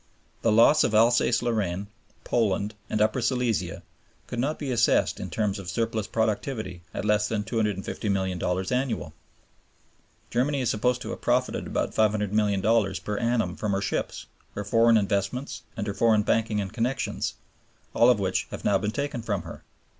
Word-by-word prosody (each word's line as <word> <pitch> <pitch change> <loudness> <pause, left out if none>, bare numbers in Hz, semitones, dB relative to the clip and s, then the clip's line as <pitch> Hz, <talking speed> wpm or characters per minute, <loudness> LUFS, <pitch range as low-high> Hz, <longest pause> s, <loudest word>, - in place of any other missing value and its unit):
The 115 - +2
loss 115 +8 +6
of 110 - +1
Alsace 120 +1 +4
Lorraine, 100 -5 -1 0.4
Poland, 105 -2 0 0.2
and 105 - 0
Upper 110 +4 +1
Silesia 120 -8 -1 0.4
could 120 - -5
not 145 +5 0
be 140 -3 -4
assessed 115 -1 +2
in - - -5
terms 105 -2 -1
of 95 -3 -7
surplus 110 +1 -1
productivity 110 -4 -2
at - - -4
less 105 0 +2
than 105 -1 -1
$250,000,000 95 -4 -1
annually. 125 -1 -1 1.2
Germany 135 +3 +1
is 125 - +1
supposed 125 +4 0
to - - -5
have - - -7
profited 125 +1 0
about - - -2
$500,000,000 105 0 +2
per 105 -1 -2
annum 115 -6 0
from 105 -2 -2
her 95 - +1
ships, - - -3 0.3
her 105 - -3
foreign 115 +2 +4
investments, 100 +6 -1 0.2
and - - -2
her 100 - -2
foreign 110 -1 +3
banking 110 0 +1
and 100 0 -4
connections, 125 +3 -2 0.6
all - - +5
of - - +4
which - - -1
have - - -8
now 100 -1 +3
been 105 +2 -1
taken 140 +2 -3
from 105 -6 -2
her. - - -10
110 Hz, 160 wpm, -26 LUFS, 100-120 Hz, 1.2 s, loss